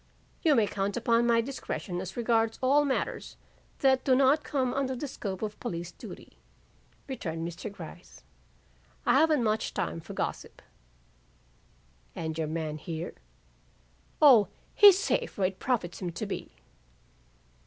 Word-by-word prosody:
"You 310 -4 +4
may 225 - +4
count 200 +1 -2
upon 235 0 +2
my 230 -1 +4
discretion 225 -7 -5
as 190 +3 -7
regards 225 -1 +1
all 285 +3 +4
matters 270 - -2 0.4
that 265 -1 +4
do 260 - +4
not 275 +3 +4
come 260 -3 -1
under 265 -1 -1
the 285 +4 -4
scope 200 -6 -5
of 210 -1 -4
police 175 -6 -5
duty," - - -12 0.7
returned 165 - -4
Mr. 175 +5 -6
Gryce. 170 -5 -12 0.8
"I 240 - +4
haven't 305 -5 +3
much 220 0 -1
time - - -2
for 160 - -9
gossip." - - -4 1.5
"And 160 -2 -4
your 160 -1 -2
man 155 -1 -3
here?" 165 +2 -5 1.1
"O, 245 -10 +7 0.3
he's 405 -3 +8
safe 475 +4 -1
where 195 - +2
it 190 - -15
profits 215 -10 -2
him 175 -2 -3
to - - -4
be." - - -5
225 Hz, 145 wpm, -29 LUFS, 175-265 Hz, 1.5 s, he's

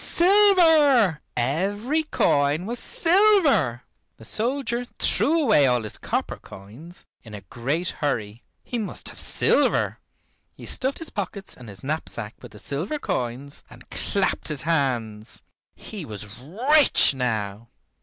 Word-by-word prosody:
Silver, 325 - +4 0.2
every 200 - 0
coin 145 - +1
was 235 +3 -4
silver! 340 - +3 0.3
The 110 - -13
soldier 240 - -1
threw 325 +4 +2
away 210 - +4
all 125 -2 +1
his 110 - -3
copper - - -3
coins 120 - -12 0.2
in 110 -2 -11
a 100 - -9
great 135 - -3
hurry. 115 -7 -3 0.2
He 240 - -4
must 210 - -4
have - - -10
silver. - - +2 0.6
He - - -11
stuffed 265 +1 -2
his 325 - -7
pockets 200 -1 -5
and 125 -3 -12
his 100 -1 -10
knapsack 135 -7 -4
with - - -12
the - - -12
silver 150 - -3
coins, 130 - -4
and - - -15
clapped - - -1
his 145 -3 -2
hands. 120 -9 -2 0.3
He 210 -5 -8
was 105 -6 -8
rich 245 - +3
now. 110 -4 -3
155 Hz, 135 wpm, -24 LUFS, -, 0.6 s, Silver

